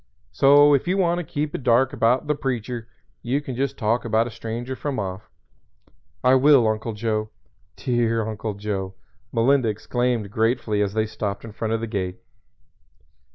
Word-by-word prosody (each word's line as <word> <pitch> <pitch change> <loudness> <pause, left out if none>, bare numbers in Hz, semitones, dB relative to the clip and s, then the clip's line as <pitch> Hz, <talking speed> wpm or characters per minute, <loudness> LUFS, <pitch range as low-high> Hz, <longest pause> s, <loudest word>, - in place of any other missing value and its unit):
So 145 +1 +6
if 140 +4 +1
you 185 +2 +1
want 175 -2 +2
to - - -3
keep 150 -1 -3
it - - -4
dark 125 +1 +3
about 125 +5 +2
'The 150 - +1
Preacher' 125 -4 -4 0.3
you 130 +4 0
can 135 -4 -6
just 135 +3 -2
talk 115 +1 0
about 115 0 +2
a 120 - -6
stranger 115 +3 -5
from 140 0 -4
off." 95 0 -5 0.9
"I 125 +1 +5
will, 130 -2 +6
Uncle 110 +1 -2
Joe 110 0 -2 0.5
dear 115 -3 0
Uncle 110 -1 -4
Joe." 100 -2 -4 0.4
Melinda 125 +1 +3
exclaimed 115 0 -1
gratefully 110 -2 0
as 100 0 -1
they 110 0 +2
stopped 105 -1 -4
in 115 - -8
front 110 +1 -2
of 115 - -3
the - - -1
gate. 95 -5 -3
115 Hz, 170 wpm, -23 LUFS, 110-130 Hz, 0.9 s, So